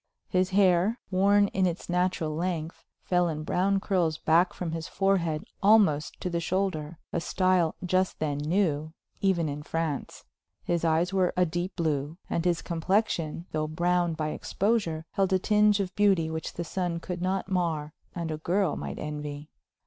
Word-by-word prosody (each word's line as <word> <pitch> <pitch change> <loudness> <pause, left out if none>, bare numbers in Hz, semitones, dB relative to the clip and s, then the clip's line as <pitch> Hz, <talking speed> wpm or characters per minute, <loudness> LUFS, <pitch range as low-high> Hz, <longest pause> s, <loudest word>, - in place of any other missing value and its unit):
His 185 0 +2
hair, 190 +3 +3
worn 200 +2 +4
in 190 -1 +1
its 170 -1 -4
natural 180 -3 0
length, 170 -1 -3 0.2
fell 180 -1 +2
in 155 -1 -4
brown 195 +5 +1
curls 180 -6 0
back 170 +4 +3
from 175 -3 -4
his 165 0 -4
forehead 180 -6 0 0.2
almost 195 -8 +4
to 180 - -2
the 170 - 0
shoulder, 170 -3 -2 0.2
a 170 - 0
style 185 -2 +2
just 185 +1 +1
then 145 -2 -2
new, 155 -1 0 0.3
even 185 -5 +2
in 145 0 -4
France. 160 -2 -3 0.4
His 170 -1 -1
eyes 165 +3 +2
were 185 -2 +2
a 180 - +4
deep 175 +3 -3
blue, 155 -1 -1
and 170 - 0
his 175 -2 +1
complexion, 170 -2 0
though 155 0 -1
browned 175 +1 0
by 155 -1 -1
exposure, 185 -3 -1
held 195 -1 +1
a - - +5
tinge 210 +1 +3
of 190 -1 -3
beauty 190 -6 +3
which 160 0 -4
the 170 - -4
sun 175 0 -2
could 175 +1 -5
not 190 +1 -1
mar 160 -5 -1 0.2
and 170 -2 -3
a 155 - -4
girl 180 0 +1
might - - -5
envy. 150 0 -6
175 Hz, 170 wpm, -28 LUFS, 160-190 Hz, 0.4 s, a